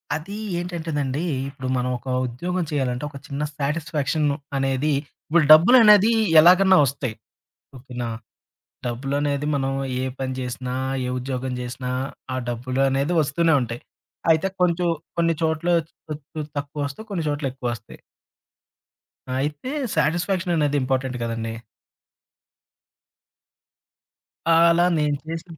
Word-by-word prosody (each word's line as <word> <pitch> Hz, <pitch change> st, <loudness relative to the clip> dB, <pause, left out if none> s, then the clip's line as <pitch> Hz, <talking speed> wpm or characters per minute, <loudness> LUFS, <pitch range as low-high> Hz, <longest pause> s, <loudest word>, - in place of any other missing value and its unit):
అదీ 185 Hz, +7 st, -6 dB, 0.2 s
ఏంటంటేనండీ, 160 Hz, -4 st, -3 dB, 0.2 s
ఇప్పుడు 130 Hz, -2 st, -7 dB
మనం 125 Hz, 0 st, -1 dB
ఒక 125 Hz, -, -16 dB, 0.2 s
ఉద్యోగం 175 Hz, +9 st, -3 dB
చెయ్యాలంటే, 130 Hz, -1 st, -1 dB
ఒక 140 Hz, -, -10 dB
చిన్న 140 Hz, 0 st, -4 dB, 0.2 s
సాటిస్ఫాక్షన్ను 150 Hz, 0 st, -1 dB, 0.2 s
అనేది 135 Hz, +2 st, +1 dB, 0.3 s
ఇప్పుడు 165 Hz, 0 st, +3 dB
డబ్బులనేదీ 210 Hz, +4 st, +7 dB, 0.3 s
ఎలాగన్నా 185 Hz, +3 st, +6 dB
ఒస్తాయి. 130 Hz, -3 st, -3 dB, 0.6 s
ఓకే 125 Hz, 0 st, -13 dB
నా? 115 Hz, -, -2 dB, 0.8 s
డబ్బులనేది 140 Hz, +4 st, -1 dB
మనం 135 Hz, 0 st, -1 dB, 0.3 s
ఏ -, -, -1 dB
పని 130 Hz, -1 st, -2 dB
జేసినా, 125 Hz, 0 st, -4 dB, 0.3 s
ఏ -, -, -3 dB
ఉద్యోగం 130 Hz, 0 st, -3 dB
జేసినా 125 Hz, +1 st, -5 dB, 0.4 s
ఆ -, -, -1 dB
డబ్బులు 125 Hz, +2 st, -2 dB
అనేది 135 Hz, +5 st, 0 dB
ఒస్తూనే 160 Hz, +3 st, +1 dB
ఉంటాయి. 120 Hz, 0 st, -4 dB, 0.5 s
అయితే 160 Hz, +4 st, +3 dB
కొంచుం 175 Hz, 0 st, +2 dB, 0.3 s
కొన్ని 165 Hz, -1 st, +2 dB
చోట్ల 160 Hz, +1 st, 0 dB, 0.4 s
కొంచుం 155 Hz, 0 st, -6 dB
తక్కువొస్తయి, 145 Hz, +7 st, -4 dB
కొన్ని 185 Hz, -5 st, -2 dB
చోట్లెక్కువొస్తయి. 130 Hz, -6 st, -4 dB, 1.4 s
అయితే 150 Hz, -, -3 dB, 0.2 s
సాటిస్ఫాక్షననేది 170 Hz, -2 st, +1 dB
ఇంపార్టెంట్ 130 Hz, -1 st, -1 dB
కదండీ. 115 Hz, -1 st, -3 dB, 3.0 s
ఆహ్, 165 Hz, +1 st, +6 dB
అలా 175 Hz, +1 st, +4 dB
నేను 150 Hz, -1 st, +1 dB
చేసిన 165 Hz, 0 st, -7 dB
145 Hz, 110 wpm, -23 LUFS, 130-165 Hz, 3.0 s, డబ్బులనేదీ